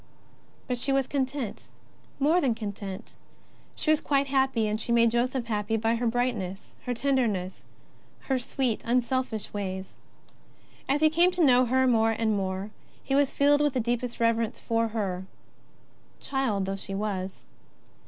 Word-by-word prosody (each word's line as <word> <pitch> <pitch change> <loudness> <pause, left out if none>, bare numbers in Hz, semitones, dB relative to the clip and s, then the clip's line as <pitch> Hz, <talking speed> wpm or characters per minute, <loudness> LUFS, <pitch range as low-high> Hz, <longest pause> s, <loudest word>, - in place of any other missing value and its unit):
But 250 -3 -2
she 275 +3 +1
was 270 -1 +2
content, 265 -3 -3 0.5
more 315 +6 +3
than 250 -5 +1
content; 200 -1 -6 0.6
she 310 - +1
was 310 - +3
quite 280 -1 +2
happy, 265 -5 +1
and 215 +1 -1
she - - -2
made 235 -1 +4
Joseph 245 +1 0
happy 220 0 -1
by 225 +1 +1
her 235 +1 0
brightness, 225 -6 -2
her 250 - -1
tenderness, 230 -9 0 0.6
her 265 -2 0
sweet, 245 -2 -1
un 245 +2 +2
selfish 245 -4 -2
ways. 190 -2 -5 0.9
As 285 +2 +2
he 310 - +6
came 340 +3 +4
to 355 -3 +3
know 255 -1 +5
her 260 +2 +2
more 225 -3 +3
and 220 -1 0
more, 190 +1 -3 0.3
he 270 - -2
was 280 -1 +3
filled 290 +1 +3
with 295 -2 +2
the 260 - 0
deepest 240 +1 -2
reverence 230 0 +1
for 230 -1 0
her, 190 -4 -3 0.9
child 240 -8 -1
though 195 +1 -3
she 195 0 -5
was. 195 -2 -4
235 Hz, 160 wpm, -27 LUFS, 210-265 Hz, 0.9 s, he